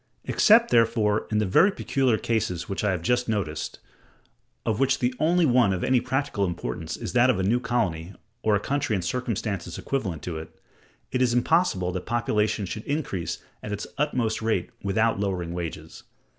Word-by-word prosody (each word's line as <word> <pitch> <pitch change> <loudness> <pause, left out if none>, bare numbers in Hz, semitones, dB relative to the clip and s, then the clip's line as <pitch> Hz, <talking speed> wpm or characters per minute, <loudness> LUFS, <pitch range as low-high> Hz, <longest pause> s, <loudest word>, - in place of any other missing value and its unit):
Except, 230 +2 +5
therefore, 115 -2 +2
in 110 - 0
the 105 - +2
very 170 - +5
peculiar 135 - +1
cases 110 -7 -1
which 100 - -3
I 105 - +2
have 90 -3 -1
just 125 +4 +1
noticed, 95 -9 -2 0.9
of 110 -1 0
which 135 0 +3
the 125 0 0
only 170 +2 +3
one 120 -7 +4
of 90 - -3
any 130 -2 +3
practical 130 -4 -1
importance 80 -4 -3
is - - -5
that 125 +1 +5
of 125 - +3
a 95 - -1
new 115 +6 +2
colony, 95 -8 -2 0.3
or 110 -1 +3
a - - +2
country 140 0 -1
in 95 - -2
circumstances 100 -4 -3
equivalent 95 - -3
to 80 -3 -4
it, 80 - -12 0.5
it 130 - 0
is 120 -2 +3
impossible 125 - +2
that 90 0 -5
population 110 -3 0
should 110 +4 -6
increase 140 - -3 0.2
at 105 - -6
its 105 0 -3
utmost 125 -8 0
rate 115 +2 -1
without 110 +2 +1
lowering 90 -4 -2
wages. 80 -2 -6
110 Hz, 180 wpm, -25 LUFS, 95-125 Hz, 0.9 s, Except